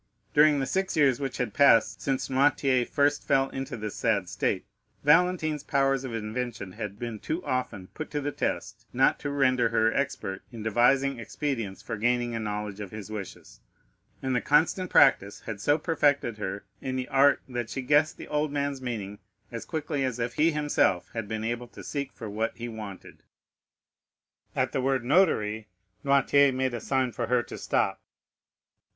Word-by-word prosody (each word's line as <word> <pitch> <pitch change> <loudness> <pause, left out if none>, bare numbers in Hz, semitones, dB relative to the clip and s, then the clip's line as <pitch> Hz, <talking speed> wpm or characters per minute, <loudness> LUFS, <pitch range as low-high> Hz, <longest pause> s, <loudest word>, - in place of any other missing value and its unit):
During 150 -1 +5
the 135 - 0
six 190 +3 -1
years 135 -5 +4
which 135 -2 -3
had 120 -5 -2
passed 140 -5 +4
since 135 -1 -1
Noirtier 135 -2 +2
first 145 0 +2
fell 135 0 +2
into 135 -2 -5
this 105 -1 -5
sad - - 0
state, - - -1 0.4
Valentine's 155 -1 +3
powers 135 -1 +1
of 130 - -5
invention 115 -2 -4
had 100 +2 -6
been 115 -2 -5
too 165 - -4
often 120 -7 -2
put 155 - -6
to 150 - -2
the 145 0 -2
test - - -4
not - - +3
to 145 - -4
render 130 -4 +2
her 115 0 +2
expert 115 -8 -2
in 115 -3 -8
devising 125 +4 +2
expedients 115 -4 -4
for - - -4
gaining 120 +2 +1
a 115 - -2
knowledge 105 -1 -4
of 100 -2 -6
his 105 0 -8
wishes, 105 -3 -8 0.6
and 130 -1 0
the 125 - +1
constant 165 +5 +2
practice 100 -7 +4
had 105 -2 -6
so 145 +6 +3
perfected 145 -8 +1
her 100 0 -4 0.2
in 130 -1 -3
the 130 -1 -3
art 140 +1 +5
that 120 -3 -4
she 135 - -4
guessed 145 +4 +3
the - - -9
old 150 0 -1
man's 140 -2 -2
meaning 105 -5 -5 0.3
as 115 - -6
quickly 150 -3 -2
as 130 -3 -1
if 120 0 -2
he 160 +5 +3
himself 145 - +1
had 115 -2 -4
been 110 0 -3
able 120 +2 -3
to - - -12
seek 140 -2 -4
for 115 - -8
what 110 +2 -2
he 120 +1 -5
wanted. 110 -4 -9 1.3
At - - +1
the 130 - -1
word 130 -1 0
Notary, 110 - +2 0.4
Noirtier 140 0 +4
made 130 -1 -1
a 120 - -4
sign 130 -2 0
to 120 +1 -3
her 125 0 +2
to - - -9
stop. - - 0
130 Hz, 180 wpm, -27 LUFS, 110-140 Hz, 1.3 s, During